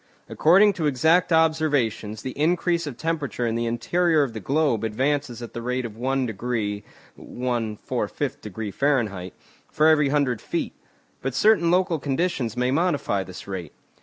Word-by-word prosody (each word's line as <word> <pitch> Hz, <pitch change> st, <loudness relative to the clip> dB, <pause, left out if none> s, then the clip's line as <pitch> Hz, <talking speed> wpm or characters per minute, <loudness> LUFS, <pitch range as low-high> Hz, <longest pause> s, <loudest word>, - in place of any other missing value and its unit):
According 195 Hz, +6 st, +5 dB
to 160 Hz, -5 st, -1 dB
exact 160 Hz, +7 st, +3 dB
observations, 145 Hz, -10 st, +1 dB
the 130 Hz, -, -4 dB
increase 170 Hz, +3 st, 0 dB
of 130 Hz, -5 st, -6 dB
temperature 155 Hz, -6 st, -2 dB
in 115 Hz, -, 0 dB
the 115 Hz, 0 st, -1 dB
interior 155 Hz, +7 st, +2 dB
of 125 Hz, -5 st, -4 dB
the 110 Hz, -, -5 dB
globe 135 Hz, -2 st, +1 dB
advances 125 Hz, +2 st, -1 dB
at 120 Hz, -, -9 dB
the 120 Hz, -, -5 dB
rate 125 Hz, +1 st, -2 dB
of 110 Hz, -3 st, -7 dB
one 130 Hz, +3 st, 0 dB
degree 110 Hz, -2 st, -3 dB, 0.3 s
(1 120 Hz, -4 st, -3 dB
4/5° 105 Hz, 0 st, -3 dB
Fahr.) 110 Hz, -10 st, 0 dB, 0.4 s
for 155 Hz, -, +3 dB
every 150 Hz, -3 st, +4 dB
hundred 135 Hz, -6 st, +1 dB
feet. -, -, -3 dB, 0.5 s
But 135 Hz, -1 st, -3 dB
certain 185 Hz, 0 st, +4 dB
local 180 Hz, -2 st, +2 dB
conditions 135 Hz, -4 st, -1 dB
may 125 Hz, +1 st, +1 dB
modify 145 Hz, -, 0 dB
this 95 Hz, 0 st, -10 dB
rate. 90 Hz, -6 st, -6 dB
130 Hz, 155 wpm, -24 LUFS, 115-160 Hz, 0.5 s, According